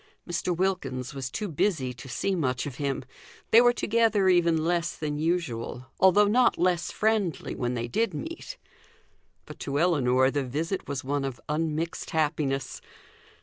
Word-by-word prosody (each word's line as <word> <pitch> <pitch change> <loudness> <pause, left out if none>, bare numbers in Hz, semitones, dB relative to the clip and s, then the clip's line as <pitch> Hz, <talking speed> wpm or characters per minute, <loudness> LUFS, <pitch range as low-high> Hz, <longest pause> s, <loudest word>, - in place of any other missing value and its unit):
Mr. 175 0 -1
Wilkins 145 -9 -1
was 135 -2 -4
too 210 +10 -3
busy 150 -6 0
to 125 +2 -11
see 135 +11 -1
much 130 -8 -1
of 135 -4 -6
him; 140 -2 -2 0.5
they 230 - +8
were 245 0 +6
together 225 -4 +2
even 170 -3 +3
less 170 0 0
than 150 -1 -3
usual, 150 -7 -2
although 190 +2 +6
not 245 +4 +3
less 175 -2 +1
friendly 215 -6 0
when 125 0 -2
they 120 0 -2
did 225 - 0
meet. 335 +10 -6 0.9
But - - -11
to 140 0 -2
Ellinor 130 -6 +3
the 145 0 -1
visit 160 +9 -3
was 140 -2 -3
one 140 +1 -1
of 135 -3 -4
unmixed 160 +2 -2
happiness. 145 -4 -1
160 Hz, 155 wpm, -27 LUFS, 135-185 Hz, 0.9 s, they